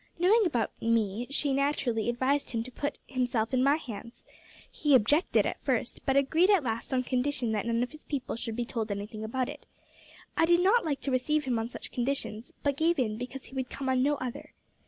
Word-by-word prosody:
Knowing 390 +5 +4
about 235 -9 0
me, 230 0 +1
she 280 0 0
naturally 270 -5 0
advised 260 +4 +1
him 230 -1 -2
to 255 - -9
put 290 +4 -3
himself 245 -2 -1
in 255 - +3
my 280 +2 +5
hands. 235 -5 -8 0.5
He 295 -2 +3
objected 290 - +3
at - - -3
first, - - -1
but 270 - +3
agreed 320 +7 +4
at 395 -7 +5
last 230 0 -3
on 255 -1 +1
condition 250 -2 0
that 215 +1 -1
none 230 +1 +1
of 250 - -4
his 310 0 -13
people 270 -4 -3
should 225 -1 -4
be 240 0 -1
told 230 -2 -3
anything 205 +2 -5
about 250 +4 -1
it. 290 +1 -9 0.7
I 325 - +4
did 345 +1 +4
not 415 +6 +4
like 290 -4 -2
to 275 - -2
receive 300 +4 +1
him 245 -3 0
on 225 +1 -3
such - - -8
conditions, 245 -3 -2
but 280 -1 +1
gave 335 +2 +2
in 220 -4 0
because 255 +1 -6
he - - -15
would 260 -1 -2
come 270 -1 -4
on 260 -1 +3
no 290 +3 +3
other. 255 -3 -6
255 Hz, 220 wpm, -29 LUFS, 235-290 Hz, 0.7 s, my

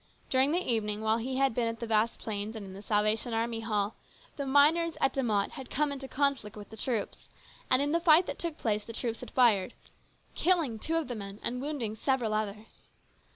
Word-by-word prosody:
During 265 +2 +4
the 355 +3 +1
evening, 215 -3 0
while 220 +1 +2
he 260 +3 -3
had 270 -2 +2
been 235 0 0
at 230 0 -4
the 235 - -3
Vasplaines' 220 -1 0
and 215 -2 -6
in 190 - -9
the 195 - -9
Salvation 215 +3 +1
Army 230 0 -1
Hall, 210 -2 -1 0.4
the 280 -1 -4
miners 315 +5 +4
at 270 - +2
De 270 - 0
Mott 210 -5 +1
had 265 -2 -9
come 295 0 0
in 280 - -4
conflict 270 -5 -1
with 205 0 -10
the - - -8
troops, 225 -2 -3 0.4
and 255 +2 +4
in 290 - 0
the 335 - +2
fight 340 +1 +6
that - - -5
took 335 -3 -3
place 210 -2 0
the 230 - -9
troops 230 -1 -3
had - - -8
fired, 220 -7 +3 0.6
killing 325 -11 +1
two 325 +8 -2
of 330 -4 0
the 250 - -4
men 200 -2 -7
and 250 +1 -2
wounding 270 -7 -3
several 240 -2 0
others. 215 0 -5
230 Hz, 215 wpm, -30 LUFS, 215-275 Hz, 0.6 s, fight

